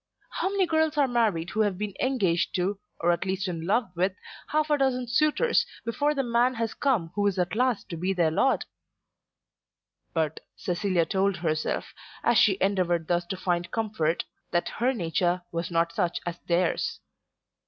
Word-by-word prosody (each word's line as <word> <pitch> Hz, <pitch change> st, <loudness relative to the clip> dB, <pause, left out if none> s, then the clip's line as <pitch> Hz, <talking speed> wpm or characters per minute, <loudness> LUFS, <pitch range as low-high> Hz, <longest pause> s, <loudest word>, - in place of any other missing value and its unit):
How -, -, -1 dB
many 395 Hz, -1 st, +2 dB
girls 315 Hz, -2 st, +1 dB
are 285 Hz, -2 st, +4 dB
married 215 Hz, -9 st, +1 dB
who 220 Hz, -, +1 dB
have 205 Hz, -4 st, +1 dB
been 210 Hz, 0 st, -3 dB
engaged 195 Hz, -10 st, +1 dB
to, 190 Hz, +2 st, 0 dB, 0.2 s
or 175 Hz, +1 st, +4 dB
at 170 Hz, -, 0 dB
least 190 Hz, +1 st, -2 dB
in 165 Hz, -2 st, -4 dB
love 225 Hz, 0 st, +1 dB
with, 185 Hz, +2 st, +1 dB, 0.3 s
half 305 Hz, 0 st, 0 dB
a 295 Hz, -, +4 dB
dozen 255 Hz, -2 st, +1 dB
suitors 305 Hz, -, +3 dB, 0.2 s
before 290 Hz, +6 st, 0 dB
the 275 Hz, -, +1 dB
man 240 Hz, +1 st, +2 dB
has 225 Hz, -1 st, -2 dB
come 225 Hz, -, 0 dB
who 205 Hz, -1 st, +1 dB
is 195 Hz, -1 st, 0 dB
at 180 Hz, -1 st, 0 dB
last 250 Hz, -2 st, +1 dB
to 170 Hz, -, -5 dB
be 180 Hz, +4 st, 0 dB
their 170 Hz, -4 st, +2 dB
lord! 265 Hz, +11 st, +2 dB, 1.5 s
But 160 Hz, -2 st, -1 dB, 0.2 s
Cecilia 180 Hz, -1 st, 0 dB
told 195 Hz, +3 st, +1 dB
herself, 155 Hz, -2 st, -2 dB, 0.3 s
as 235 Hz, -1 st, +4 dB
she 200 Hz, -5 st, +4 dB
endeavoured 180 Hz, -4 st, +1 dB
thus 175 Hz, 0 st, +1 dB
to 190 Hz, -, -4 dB
find 175 Hz, -1 st, -1 dB
comfort, 205 Hz, -7 st, -1 dB, 0.2 s
that 175 Hz, -, 0 dB
her 250 Hz, +3 st, +1 dB
nature 175 Hz, -4 st, 0 dB
was 170 Hz, +1 st, -3 dB
not 170 Hz, 0 st, +1 dB
such 175 Hz, -1 st, 0 dB
as 175 Hz, -1 st, -4 dB
theirs. 175 Hz, 0 st, +1 dB
195 Hz, 175 wpm, -27 LUFS, 175-240 Hz, 1.5 s, are